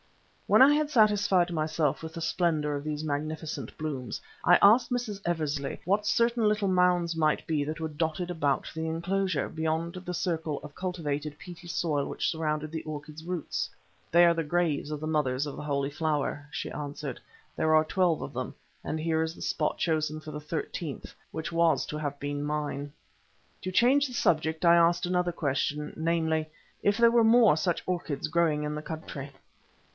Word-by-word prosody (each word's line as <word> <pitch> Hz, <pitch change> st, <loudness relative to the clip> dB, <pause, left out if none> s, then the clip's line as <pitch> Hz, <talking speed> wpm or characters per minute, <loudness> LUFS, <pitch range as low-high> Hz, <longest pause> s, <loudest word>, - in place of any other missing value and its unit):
When -, -, +7 dB
I 285 Hz, +2 st, +7 dB
had 300 Hz, 0 st, +1 dB
satisfied 205 Hz, -, +3 dB
myself 155 Hz, -2 st, 0 dB
with 160 Hz, 0 st, -7 dB
the 165 Hz, -, -5 dB
splendour 160 Hz, -4 st, 0 dB
of 145 Hz, -, -4 dB
these 155 Hz, 0 st, -3 dB
magnificent 150 Hz, -3 st, -4 dB
blooms, 145 Hz, -5 st, -4 dB, 0.2 s
I 175 Hz, -, +7 dB
asked 235 Hz, +5 st, +6 dB
Mrs. 235 Hz, -5 st, -2 dB
Eversley 150 Hz, -5 st, -2 dB
what 205 Hz, +3 st, +1 dB
certain 235 Hz, -2 st, +3 dB
little 210 Hz, -1 st, +1 dB
mounds 180 Hz, -2 st, +2 dB
might 155 Hz, -2 st, +1 dB
be 155 Hz, -3 st, +1 dB
that 155 Hz, +3 st, -4 dB
were 160 Hz, -, -2 dB
dotted 160 Hz, +3 st, -2 dB
about 145 Hz, -5 st, 0 dB
the 160 Hz, 0 st, -3 dB
enclosure, 175 Hz, 0 st, -1 dB
beyond 160 Hz, +1 st, -2 dB
the 180 Hz, -1 st, -6 dB
circle 165 Hz, -4 st, -2 dB
of 150 Hz, -1 st, -10 dB
cultivated 150 Hz, -5 st, -3 dB
peaty 175 Hz, +1 st, -11 dB
soil 155 Hz, -4 st, 0 dB
which -, -, -2 dB
surrounded 155 Hz, -1 st, -2 dB
the 160 Hz, -, -4 dB
orchid's 155 Hz, 0 st, -7 dB
roots. 175 Hz, -2 st, -3 dB, 0.4 s
"They 175 Hz, +1 st, +7 dB
are 170 Hz, -, +5 dB
the 165 Hz, -1 st, -1 dB
graves 155 Hz, -2 st, 0 dB
of 150 Hz, -, -3 dB
the 155 Hz, -, -4 dB
Mothers 145 Hz, -3 st, 0 dB
of 145 Hz, -, -6 dB
the -, -, -7 dB
Holy 140 Hz, -1 st, -1 dB
Flower," 145 Hz, -1 st, -1 dB
she 160 Hz, -, -4 dB
answered. 145 Hz, -2 st, -5 dB, 0.4 s
"There 155 Hz, 0 st, +2 dB
are 155 Hz, 0 st, +5 dB
twelve 175 Hz, -1 st, +1 dB
of -, -, -6 dB
them, -, -, -4 dB, 0.3 s
and 155 Hz, -, -3 dB
here 160 Hz, 0 st, +1 dB
is 160 Hz, +1 st, -2 dB
the -, -, -13 dB
spot 150 Hz, -, -1 dB
chosen 155 Hz, -2 st, 0 dB
for 155 Hz, 0 st, -9 dB
the 150 Hz, 0 st, -6 dB
thirteenth, 155 Hz, 0 st, -5 dB, 0.2 s
which 160 Hz, +1 st, -4 dB
was 165 Hz, -3 st, +3 dB
to 150 Hz, -, -5 dB
have 145 Hz, -2 st, -4 dB
been 145 Hz, 0 st, -3 dB
mine." 145 Hz, -1 st, -3 dB, 0.7 s
To 185 Hz, -, -4 dB
change 265 Hz, +8 st, +4 dB
the 250 Hz, -, -9 dB
subject 160 Hz, -6 st, +1 dB
I 170 Hz, 0 st, +7 dB
asked 170 Hz, +1 st, +4 dB
another 180 Hz, 0 st, +1 dB
question, 150 Hz, -1 st, -2 dB
namely: 160 Hz, -1 st, 0 dB, 0.3 s
If 205 Hz, +1 st, +2 dB
there 235 Hz, 0 st, +6 dB
were 235 Hz, -1 st, +5 dB
more 225 Hz, -6 st, +6 dB
such 160 Hz, +2 st, -1 dB
orchids 160 Hz, -6 st, -2 dB
growing 155 Hz, -2 st, +1 dB
in 150 Hz, 0 st, -2 dB
the 150 Hz, -, -4 dB
country? 150 Hz, -3 st, -7 dB
160 Hz, 185 wpm, -28 LUFS, 150-175 Hz, 0.7 s, When